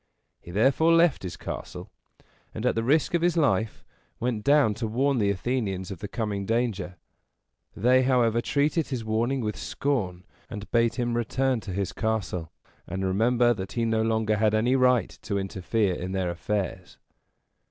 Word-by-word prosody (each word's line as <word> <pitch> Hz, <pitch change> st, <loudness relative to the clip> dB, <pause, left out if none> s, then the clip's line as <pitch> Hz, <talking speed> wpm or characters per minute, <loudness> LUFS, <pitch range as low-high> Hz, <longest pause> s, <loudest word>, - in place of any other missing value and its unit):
He -, -, -14 dB
therefore 135 Hz, -, +3 dB
left 165 Hz, -3 st, +4 dB
his 90 Hz, -3 st, -6 dB
castle, -, -, -7 dB, 0.6 s
and, 110 Hz, -, -4 dB
at 125 Hz, -, +3 dB
the 115 Hz, -, -1 dB
risk 150 Hz, +9 st, +2 dB
of 170 Hz, -, +2 dB
his 175 Hz, 0 st, +2 dB
life, 110 Hz, -, +1 dB, 0.3 s
went 115 Hz, -3 st, -2 dB
down 140 Hz, -5 st, +4 dB
to 115 Hz, +2 st, -3 dB
warn 130 Hz, +4 st, +1 dB
the 100 Hz, -2 st, +2 dB
Athenians 100 Hz, -2 st, -2 dB
of 95 Hz, -, -7 dB
the 100 Hz, -, -5 dB
coming 105 Hz, -2 st, -3 dB
danger. 110 Hz, -6 st, -1 dB, 0.8 s
They, 125 Hz, +4 st, +4 dB
however, 120 Hz, -3 st, +2 dB
treated 150 Hz, +5 st, +1 dB
his 125 Hz, -5 st, -4 dB
warning 120 Hz, +5 st, 0 dB
with 105 Hz, -2 st, -2 dB
scorn, 95 Hz, -11 st, -2 dB, 0.3 s
and 105 Hz, -4 st, -8 dB
bade 115 Hz, -1 st, +2 dB
him 120 Hz, -2 st, -1 dB
return 130 Hz, +2 st, 0 dB
to 105 Hz, -, -7 dB
his 95 Hz, +1 st, -2 dB
castle, 100 Hz, -7 st, -2 dB, 0.4 s
and 95 Hz, +1 st, -3 dB
remember 120 Hz, +5 st, +3 dB
that 95 Hz, -3 st, -6 dB
he 115 Hz, -1 st, 0 dB
no 110 Hz, -1 st, +1 dB
longer 110 Hz, -1 st, +1 dB
had 110 Hz, 0 st, +2 dB
any 120 Hz, +4 st, +2 dB
right 125 Hz, -5 st, +3 dB
to 105 Hz, -2 st, -2 dB
interfere 95 Hz, +1 st, -1 dB
in 90 Hz, +2 st, -5 dB
their 95 Hz, -2 st, -1 dB
affairs. 90 Hz, +3 st, -4 dB
110 Hz, 170 wpm, -26 LUFS, 100-125 Hz, 0.8 s, left